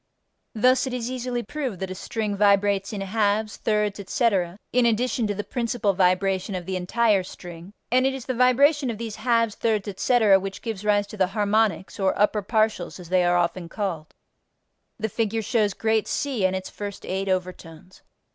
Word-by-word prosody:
Thus 255 +4 +3
it 255 - -4
is 245 0 -3
easily 250 -1 -3
proved 270 - -4
that 190 -1 -4
a - - -2
string 210 +2 -3
vibrates 200 -1 +2
in 205 -2 -4
halves, 210 +1 0
thirds, 210 -2 0
etc., 195 -3 0 0.2
in 245 -1 +4
addition 235 0 0
to 205 - -2
the 205 - -3
principal 230 -1 -1
vibration 190 +1 +1
of 180 -1 -5
the 190 +1 -3
entire 200 +3 +2
string, 175 0 -10 0.2
and 255 +1 +4
it 270 - -1
is 260 -3 -7
the 255 - -2
vibration 260 +3 +3
of 225 - -3
these 225 -1 -6
halves, 230 -1 +1
thirds, 215 -2 -1
etc., 205 0 +3
which 195 0 -7
gives 220 -4 -4
rise 205 -1 +2
to 215 - -11
the 190 -2 +3
harmonics, 210 -1 +1
or 190 -1 +1
upper 210 +1 +2
partials 215 -1 0
as 175 -2 -11
they 185 0 +3
are 175 0 +3
often 170 0 -1
called. 170 -6 -4 0.8
The 220 - -1
figure 225 +1 -1
shows 215 -4 +1
Great 220 -1 +1
C 255 -10 0
and 185 - -2
its 185 0 -5
first 205 -1 -7
eight 190 +1 -2
overtones. 180 -1 -5
205 Hz, 185 wpm, -24 LUFS, 190-230 Hz, 0.8 s, in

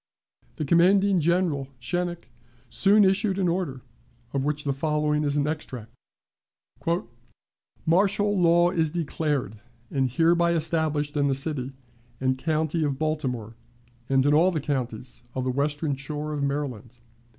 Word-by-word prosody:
The 155 - -3
commanding 190 +5 +4
General, 165 -4 +1
Schenck, 175 +3 -3 0.4
soon 200 - +5
issued 195 +1 +2
an 190 -2 +1
order, 170 -7 -2 0.5
of 135 -1 0
which 150 +1 -1
the 140 - 0
following 150 +1 0
is 145 0 0
an 145 0 +1
extract: 125 -7 -5 1.9
"Martial 200 +4 +2
law 175 -1 +4
is 160 -3 +1
declared 150 - -2 0.3
and 135 -2 +1
hereby 170 +5 +3
established 155 -2 -1
in 145 -1 +2
the 135 - +1
city 135 -2 -3 0.5
and 130 0 +1
county 155 +3 -1
of 140 -3 -1
Baltimore, 130 -8 -2 0.6
and 135 0 +3
in 145 - +4
all 165 +5 +5
the 170 -4 -1
counties 125 -5 -3
of 130 - -1
the 130 - 0
Western 145 +2 -1
Shore 150 +2 -5
of 145 - -3
Maryland. 135 -5 -3
150 Hz, 140 wpm, -26 LUFS, 135-170 Hz, 1.9 s, soon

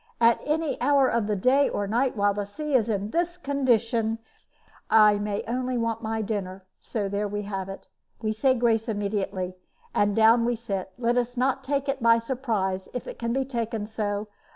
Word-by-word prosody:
At 230 0 +4
any 305 -2 -1
hour 275 0 +4
of 230 -4 0
the 210 - 0
day 260 +8 +3
or 205 - -2
night, 240 +4 0
while 205 0 +3
the 205 0 -3
sea 300 +8 -5
is 235 -4 +3
in 205 0 -1
this 345 +1 0
condition, 235 -7 +1 0.7
I 210 -2 +6
may 205 0 -2 0.3
want 230 -1 -1
my 220 -1 -2
dinner; 195 -3 -4 0.3
and 200 -3 0
there 205 +1 -1
we 205 +1 -3
have 195 -2 -4
it. 195 - -9 0.3
We 215 -2 -1
say 260 +4 +2
grace 230 -1 +1
immediately, 200 -3 -2 0.4
and 205 0 +2
down 225 +1 +5
we 240 +1 +1
sit. 200 -5 -4
Let 240 0 +1
us 245 +1 -3 0.2
take 275 +1 -1
it 275 -1 -1
by 230 0 +6
surprise, 225 -6 -2
if 250 - -3
it - - -8
can 235 0 -1
be 265 +2 0
taken 230 -4 -3
so. 210 -1 -3
225 Hz, 185 wpm, -26 LUFS, 205-245 Hz, 0.7 s, I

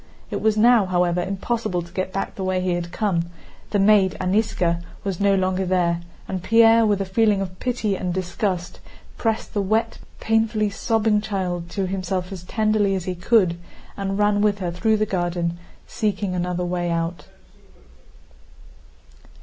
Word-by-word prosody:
It - - -2
was 215 -1 +2
now, 230 -2 +5
however, 180 -1 +1
impossible 195 0 -2
to 170 +1 -15
get 185 0 -2
back 195 - -3
the 190 - -5
way 185 0 0
he 180 -1 0
had 175 0 -3
come; 170 -6 -1 0.4
the 205 - 0
maid, 195 -1 +4
Aníska, 185 -3 +1 0.2
was 195 -3 -3
no 200 -1 +3
longer 185 0 0
there, 175 -2 +1 0.3
and 185 -1 -3
Pierre 225 +3 +5
with 205 -2 +1
a - - -1
feeling 205 +1 +2
of 185 -2 -5
pity 230 -5 -1
and 185 -1 -3
disgust 180 0 -3 0.4
pressed 225 -1 -2
the 205 - +1
wet, 215 +3 0 0.2
painfully 220 -1 +1
sobbing 220 -1 +1
child 185 -5 -3
to 195 +1 -2
himself 185 0 -3
as 190 -3 -6
tenderly 215 0 +1
as 185 - -3
he 185 - -2
could 180 -2 +2 0.4
and 195 -1 -3
ran 205 0 +2
with 205 -1 +2
her 180 -3 -3
through 215 +5 +1
the 215 - +1
garden 175 -3 -2 0.3
seeking 205 -3 -2
another 180 0 -1
way 175 0 -1
out. 170 +1 -2
190 Hz, 165 wpm, -22 LUFS, 180-215 Hz, 0.4 s, now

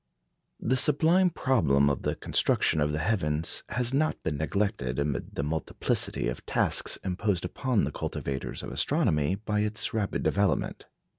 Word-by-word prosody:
The 130 +3 +1
sublime 165 +7 +4
problem 100 - +2
of 70 - 0
the - - -1
construction 80 - +1
of 75 0 +2
the 75 - -1
heavens 80 -7 0
has 125 0 -1
not 155 +3 +1
been 80 - -1
neglected 80 - -1
amid 70 -1 -2
the 70 - -1
multiplicity 80 -4 -1
of - - -4
tasks - - 0
imposed 95 -1 -1
upon 125 +4 0
the - - -1
cultivators 70 -1 -4
of - - -6
astronomy 75 +4 +1
by 105 +1 -2
its 105 +1 -2
rapid 105 -3 -1
development. 100 -5 0
100 Hz, 150 wpm, -28 LUFS, 75-115 Hz, -, sublime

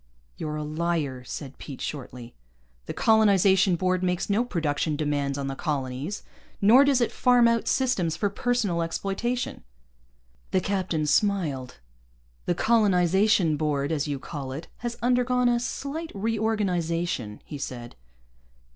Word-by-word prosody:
"You're 150 -1 -4
a 150 - -3
liar," 155 -4 -2
said 135 +1 -7
Pete 140 -4 -8
shortly. 125 -4 -6 0.5
"The - - -4
Colonization 195 -4 +4
Board 185 +1 0
makes 180 +2 -1
no 215 +4 +3
production 155 -7 -1
demands 145 -2 -1
on 140 - -3
the 135 0 -3
colonies. 140 +4 -3 0.4
Nor 235 +8 +7
does 275 -3 +3
it 235 - +1
farm 245 -2 +4
out 230 -1 +1
systems 190 -12 +1
for 205 - +1
personal 205 -4 0
exploitation." 200 +8 -2 0.9
The - - +2
captain 185 -5 -1
smiled. 150 -8 0 0.7
"The 175 - +1
Colonization 190 -5 +3
Board, 145 -1 -1
as 150 -2 -1
you 145 -1 -2
call 135 -1 -6
it, 155 +5 -7
has 235 0 -5
undergone 250 0 +2
a 240 0 +3
slight 285 +7 -4
reorganization," 180 - -1
he 145 - -7
said. 120 -3 -6
180 Hz, 135 wpm, -26 LUFS, 150-220 Hz, 0.9 s, Nor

